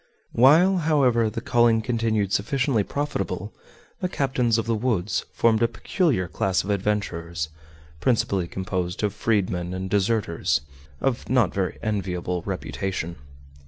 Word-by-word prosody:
While, 165 +10 +5
however, 135 -9 +3
the 115 +2 -5
calling 120 -2 +3
continued 110 -4 0
sufficiently 130 +1 +1
profitable, 105 -8 -3 0.5
the 180 - -1
captains 125 - +1
of 115 - -1
the 115 - 0
woods 105 -4 0
formed 115 -1 +2
a 115 - +5
peculiar 115 - 0
class 95 +4 0
of 105 - -2
adventurers, 85 -5 -2 0.5
principally 100 - +1
composed 90 0 -3
of 105 -2 +1
freedmen 95 -5 0
and 95 +1 -5
deserters 100 - +1 0.4
of 130 -3 -1
not 125 -2 +3
very 95 -2 -2
enviable 90 -4 -2
reputation. 90 -3 -3
105 Hz, 125 wpm, -24 LUFS, 95-120 Hz, 0.5 s, While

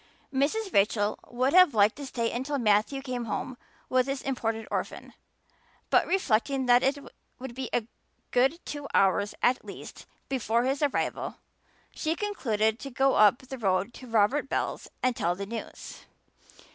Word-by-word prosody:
Mrs. 355 +10 0
Rachel 205 +1 +2
would 255 +3 0
have 365 -7 +6
liked 205 0 +4
to 285 -2 -6
stay 230 -3 -1
until 265 +4 -2
Matthew 225 +4 +2
came 250 -3 -4
home 245 +3 -4 0.3
with 255 0 +2
his 275 0 -3
imported 225 -4 -2
orphan. - - -4 0.8
But - - +4
reflecting 270 - +1
that 245 0 +5
it 275 +2 +1 0.4
would 260 -1 -7
be 255 0 -5
a 235 - 0 0.5
good 270 +7 +2
two 290 -1 -6
hours 200 +1 +2
at 250 +1 +3
least - - -10 0.2
before 235 -3 0
his 270 +3 -1
arrival 290 -2 -1 0.6
she 315 +1 -1
concluded 225 - 0
to 275 - -7
go 270 +1 +2
up 215 +4 +5
the 265 0 -8
road 195 +1 0
to 255 - -11
Robert 230 +6 +2
Bell's - - -2
and 255 -1 +2
tell 175 -3 0
the 200 +2 -5
news. 225 +2 -8
250 Hz, 160 wpm, -28 LUFS, 220-275 Hz, 0.8 s, have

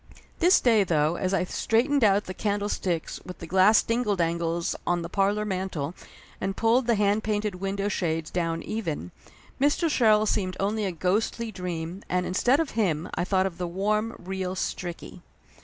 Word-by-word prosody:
This 360 +2 +5
day, 225 -4 +4
though, 160 -2 +1
as 185 +1 -1
I 195 - +2
straightened 240 +8 +1
out 205 -1 +4
the 185 - -6
candle 205 +1 -1
sticks 175 -6 -2
with 180 - -9
the 170 - -8
glass 190 +5 +5
dingle 230 -3 0
dangles 170 -1 -1
on 175 -1 +1
the 170 - -6
parlor 200 +3 +1
man 190 -1 -2
tel 150 -1 -4 0.5
and 195 0 -2
pulled 230 +2 +3
the 235 - +4
hand 205 +1 +2
painted 210 -1 -1
window 195 +1 -1
shades 165 -5 -2
down 165 -2 -1
even, 165 - -4 0.5
Mr. 295 +4 +2
Sherrill 215 -5 +4
seemed 185 -3 -1
only 210 +2 0
a 190 - -1
ghostly 205 +6 -1
dream, 180 -1 -5
and 180 0 0
instead 245 +10 +2
of 325 -3 -1
him 175 -7 0
I - - -1
thought 190 +1 +1
of 180 -3 -4
the 180 - -2
warm, 210 +5 -1
real 185 0 -4
Stricky. 175 -1 -5
195 Hz, 180 wpm, -26 LUFS, 175-215 Hz, 0.5 s, This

